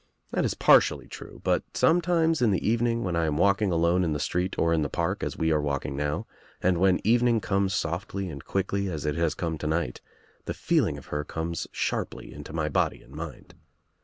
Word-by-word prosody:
That - - +1
is - - -1
partially - - +4
true - - -10
but, - - +2
sometimes 165 -2 +3
in 120 - +4
the 95 -1 0
evening 115 +1 +1
when 90 -2 -1
I 85 -1 +1
am 75 -1 0
walking 100 +2 +3
alone 85 +2 +3
in 80 -3 0
the 75 - -2
street 90 +5 -1
or 85 0 +2
in 80 - +2
the 75 - -1
park - - -1
as - - -3
we 80 0 +1
are 75 -1 +2
walking 70 -2 -2
now, 75 +1 -2 0.3
and 90 -1 +2
when 95 0 +4
evening 120 +1 +3
comes 100 -1 0
softly 95 +3 -2
and 70 -5 -7
quickly 100 0 -1
as 80 -3 -4
It 75 - +1
has 85 -1 0
come 80 -3 -3
to 75 - -3
night, 80 -5 -1 0.4
the - - -3
feeling - - +1
of - - -11
her 75 0 -1
comes 80 +2 -4
sharply - - -3
Into 75 0 -9
my 80 -1 -1
body 75 - 0
and 65 - -17
mind. 80 -1 -8
85 Hz, 215 wpm, -27 LUFS, 75-100 Hz, 0.4 s, partially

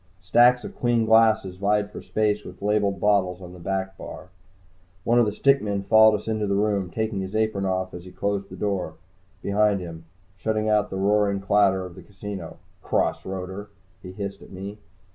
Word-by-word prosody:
Stacks 120 +7 +4
of - - -8
clean 120 -2 +1
glasses 110 -4 +4
vied 105 +1 +1
for - - -8
space 105 -1 0
with 90 +1 -11
labeled 105 -1 +1
bottles 95 -3 +2
on 90 -1 -10
the 90 - -12
back 95 +2 -3
bar. 90 - -9 0.7
One 120 +3 +3
of 120 - +4
the - - 0
stick 140 +6 +3
men 100 -2 -2
followed 110 +2 +6
us 105 - -6
into 110 -1 -1
the 100 - +1
room, 100 -2 0
taking 110 -1 -2
his 95 +2 -6
apron 110 -3 0
off 95 -1 -1
as 90 0 -8
he 90 - -11
closed 100 +1 -2
the - - -9
door 100 -3 -2 0.5
behind 105 0 +2
him, 85 -2 -8 0.3
shutting 110 +2 -1
out 105 -1 +2
the 95 - -4
roaring 100 0 +2
clatter 95 -1 +2
of 90 - -9
the - - -12
casino. 100 0 -8 0.2
"Cross - - 0
roader!" 95 +2 -6 0.3
he 90 - -9
hissed 100 0 -6
at - - -13
me. 100 +2 -8
100 Hz, 195 wpm, -24 LUFS, 95-105 Hz, 0.7 s, followed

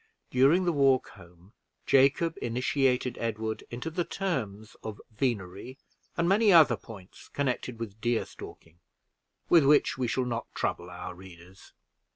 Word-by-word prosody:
During 140 +9 +4
the 175 - +1
walk 135 -3 +3
home, 90 +4 -17 0.3
Jacob 140 +5 +3
initiated 125 +1 0
Edward 110 -1 -3
into 125 +7 -5
the 175 +2 -1
terms 110 - -4
of 110 -2 -6
venery 110 0 -3 0.4
and 170 0 +1
many 205 +3 +4
other 165 -4 +7
points 100 -6 -13
connected 125 -3 -3
with 110 -2 -7
deer 120 -1 0
stalking, 80 +1 -13 0.7
with 170 -3 +6
which 145 -1 +3
we 125 - 0
shall 130 +2 0
not 120 -1 -5
trouble 85 - -2
our 90 +1 -7
readers. 90 0 -15
125 Hz, 140 wpm, -28 LUFS, 105-140 Hz, 0.7 s, other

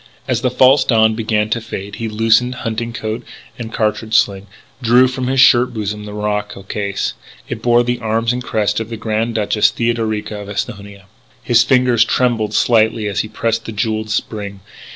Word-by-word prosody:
As 125 -3 0
the 130 - +1
false 130 +2 +5
dawn 110 -2 +3
began 110 -1 -1
to 115 - 0
fade, 100 -2 -7
he 115 -1 -3
loosened 115 +3 +2
hunting 115 +1 -2
coat 110 0 -4 0.4
and 115 -1 -6
cartridge 110 0 -1
sling, 100 0 0 0.3
drew 125 +2 +5
from 130 0 -3
his 135 +1 0
shirt 125 -1 +5
bosom 105 -1 -4
the 105 - -8
morocco 105 -1 -3
case. 100 0 -3 0.3
It - - -5
bore 120 0 +3
the 120 0 -2
arms 115 +1 0
and 125 0 -4
crest 105 -3 0
of 115 0 -5
the 115 - -5
Grand 110 +1 -2
Duchess 105 0 +2
Theodorica 110 -3 -2
of 100 - -9
Esthonia. 100 -1 -6 0.4
His 120 -1 +4
fingers 125 -3 +3
trembled 115 -3 0
slightly 110 -2 +2
as 100 -1 -2
he - - -1
pressed 115 +1 -2
the - - -5
jewelled 110 +1 -2
spring. 105 -2 -4
110 Hz, 180 wpm, -17 LUFS, 105-120 Hz, 0.4 s, false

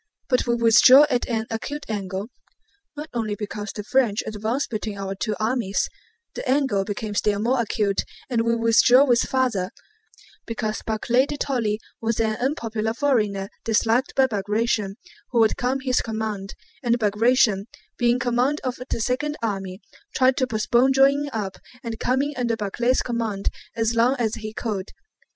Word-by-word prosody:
But 250 -1 +2
we 235 - +2
withdrew 235 +4 +7
at 245 0 0
an 225 -2 -1
acute 285 +6 -4
angle 200 0 -4 0.7
not 300 +1 -5
only 220 -3 -2
because 210 0 -5
the 210 - -6
French 225 -2 +1
advanced 220 +6 -2
between 215 -2 -4
our 195 0 -4
two 210 +2 -2
armies; 220 -3 0 0.5
the - - -5
angle 265 -8 +2
became 210 +1 -4
still 205 0 +1
more 240 +4 +1
acute 210 -3 0 0.3
and 235 -3 0
we 230 0 +1
withdrew 235 +4 +5
still 235 - 0
farther, 245 -8 0 0.8
because 220 -2 -3
Barclay 240 +4 +1
de 290 - -4
Tolly 230 -7 -1 0.2
was 225 0 -1
an 220 -1 +1
unpopular 225 -4 -2
foreigner 215 -8 +1 0.2
disliked 225 +3 +1
by 265 - +5
Bagratión 210 -2 -1 0.3
(who 240 - +1
would 220 -1 +4
come 250 +1 0
under 270 0 -4
his 255 -1 +1
command), 220 -3 -4 0.3
and 240 -1 +2
Bagratión—being 230 +1 +1
in - - -2
command 250 +4 +1
of 255 -2 -3
the - - -1
second 295 +6 -1
army—tried 205 - -1
to 260 - +1
postpone 240 +3 +2
joining 280 +2 +3
up 205 -5 -4 0.3
and 230 -2 -5
coming 270 +4 0
under 235 -2 0
Barclay's 235 +4 0
command 225 -5 -2 0.3
as 225 0 0
long 235 +3 +3
as 225 -3 0
he 215 -2 -5
could. 210 -3 -4
230 Hz, 160 wpm, -23 LUFS, 210-255 Hz, 0.8 s, withdrew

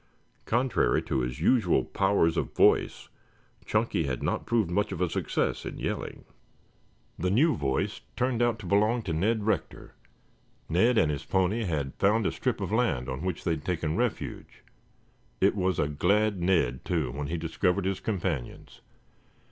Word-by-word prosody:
Contrary 125 +2 +2
to - - -2
his 60 0 -3
usual 110 -9 +3
powers 95 -4 +2
of - - -3
voice, - - +3 0.6
Chunky 105 -6 0
had 65 -3 -3
not - - -2
proved 110 -7 +1
much 105 +3 0
of 95 - -4
a 90 - +2
success - - -1
in - - -6
yelling. - - -4 0.9
The 90 - 0
new 145 - +3
voice 70 -3 -2
turned 125 -1 0
out 120 -2 +2
to 105 - -10
belong 105 +5 +2
to 85 - -3
Ned 105 +7 +1
Rector. 110 - -2 0.7
Ned 115 +9 +3
and 80 -5 +3
his 70 0 -4
pony 95 +4 0
had 75 -6 -2
found 105 +2 +3
a - - +1
strip - - -2
of - - -3
land 80 - 0
on 65 +3 -4
which 90 +1 -3
they 85 - 0
had 75 -3 -2
taken 80 -2 -2
refuge. 120 +2 -3 0.8
It 100 +2 +3
was 95 -2 0
a - - +1
glad 100 +6 +1
Ned, 85 -9 +1
too, 80 -8 -1
when 70 +2 -4
he 85 +3 -2
discovered 90 +4 0
his 95 -1 -1
companions. 90 - -4
95 Hz, 165 wpm, -28 LUFS, 80-110 Hz, 0.9 s, usual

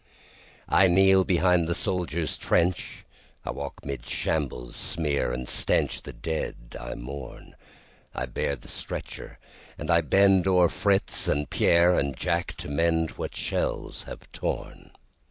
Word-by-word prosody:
I 95 - +5
kneel 95 +1 +5
behind 90 -2 +3
the 85 - 0
soldier's 85 -6 -1
trench,I 85 0 -2
walk 70 0 -7
'mid 70 -3 -4
shambles' 60 -3 -2
smear 75 -6 0
and 65 0 -4
stench, - - +2
The - - -8
dead 80 -6 -5
I - - -6
mourn;I 65 -1 -9
bear 65 +2 -2
the - - -16
stretcher - - -5 0.4
and 75 +3 -2
I 85 0 +5
bendO'er 95 +1 +4
Fritz 100 -1 +1
and 75 0 0
Pierre 85 +1 +4
and 70 -2 -2
Jack 85 -1 -1
to 85 +3 -7
mendWhat 80 +2 0
shells - - -2
have - - -8
torn. - - -5
80 Hz, 125 wpm, -26 LUFS, 70-90 Hz, 0.4 s, I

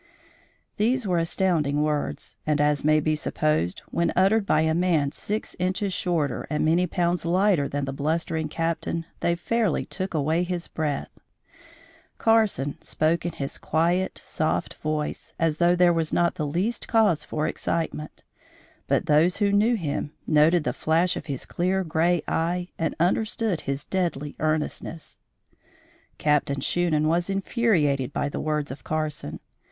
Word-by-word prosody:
These 240 +3 +1
were 180 -3 +1
astounding 165 -4 +1
words, 150 -1 -2
and, 150 -1 +2
as 150 0 +2
may 155 +1 +4
be 155 +1 +1
supposed, 150 - 0
when 170 0 +1
uttered 195 +3 +3
by 155 - +3
a 160 0 +2
man 165 -5 +2
six 210 +7 -4
inches 185 +2 0
shorter 165 -8 -1
and 150 0 0
many 170 +3 +3
pounds 175 0 0
lighter 175 -3 +2
than 145 0 -2
the 135 - -4
blustering 160 +2 -1
Captain, 165 +1 -2
they 170 - +1
fairly 220 +1 0
took 185 -2 -5
away 155 +3 +1
his 180 -1 -3
breath. 150 -3 -3 1.1
Carson 215 - +2
spoke 165 +2 0
in 170 - -4
his 140 -1 -5
quiet, 175 +4 0
soft 155 0 -1
voice, 155 -1 -3
as 165 -2 +1
though 175 +1 +4
there 175 -1 +5
was 165 -2 0
not 170 0 +2
the 150 - -3
least 185 +11 -1
cause 215 -8 +3
for 155 0 -2
excitement; 155 -2 -3 0.6
but - - +1
those 160 +4 +3
who 205 -1 +2
knew 215 +4 +3
him, 150 -5 -3
noted 155 +2 +4
the - - -1
flash 165 +3 +1
of - - -6
his 135 -4 -3
clear, 185 +2 0
gray 170 +1 +1
eye 175 +2 -1
and 160 -2 -1
understood 210 +1 +1
his 140 +1 -2
deadly 165 -6 -2
earnestness. 155 +1 -3 1.0
Captain 145 -2 +1
Shunan 155 +1 +1
was 170 +4 +1
infuriated 185 - +1
by 145 - -1
the - - -4
words 150 -2 -1
of 135 - -9
Carson. 150 - -3
165 Hz, 150 wpm, -25 LUFS, 150-180 Hz, 1.1 s, there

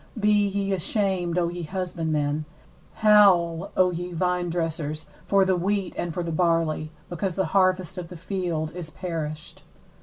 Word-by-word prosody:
11Be 205 -2 +2
ye 200 -1 0
ashamed, 185 -2 0
O 175 -1 +2
ye 175 0 -5
husbandmen; 160 -4 -2 0.6
howl, 185 -5 +5
O 185 -1 +4
ye 175 +1 -4
vinedressers, 165 -3 -1 0.2
for 195 -1 +4
the 190 -1 +2
wheat 195 +1 -1
and 175 - -2
for 175 +2 -3
the 170 - -3
barley; 165 -2 +1 0.2
because 180 +1 -3
the 190 - +1
harvest 185 -1 +2
of 175 - -6
the 175 - -10
field 170 -4 -2
is 175 -3 -7
perished. 155 -2 -5
175 Hz, 150 wpm, -25 LUFS, 165-190 Hz, 0.6 s, howl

